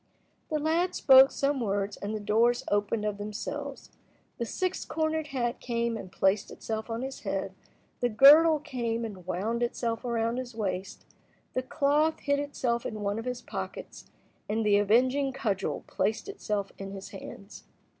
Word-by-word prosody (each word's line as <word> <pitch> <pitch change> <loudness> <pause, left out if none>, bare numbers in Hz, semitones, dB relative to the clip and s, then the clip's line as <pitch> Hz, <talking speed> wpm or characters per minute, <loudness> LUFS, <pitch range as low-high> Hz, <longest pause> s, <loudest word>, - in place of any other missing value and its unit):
The 310 - 0
lad 325 +4 +1
spoke 265 0 +8
some 280 0 0
words 200 -2 -1
and 205 +2 -4
the - - -3
doors 230 +4 +2
opened 205 +1 +1
of 205 -1 -2
themselves. 275 +7 -6 0.5
The 235 - -2
six 370 +7 -2
cornered 315 -1 -1
hat 245 -4 -2
came 235 -1 -1
and 190 -4 -7
placed 190 +1 +1
itself 220 0 -5
on 230 +2 -3
his 265 0 -5
head, - - -3 0.5
the 245 - +1
girdle 300 +7 +8
came 235 -6 -3
and 190 -5 -9
wound 215 +7 -1
itself 235 -1 -1
around 235 -1 0
his 255 -2 -5
waist, 190 -3 -4 0.5
the 255 - 0
cloth 295 +4 +1
hid 285 0 +1
itself 255 -5 -1
in 215 -1 -5
one 205 +1 -1
of 225 - -6
his 250 -1 -4
pockets, - - -7 0.4
and 220 +1 0
the 205 -1 +5
avenging 255 +6 +3
cudgel 215 -8 -2
placed 200 - -1
itself 210 - -3
in 195 0 -6
his 195 -1 -8
hands. 195 +1 -10
235 Hz, 165 wpm, -29 LUFS, 205-275 Hz, 0.5 s, spoke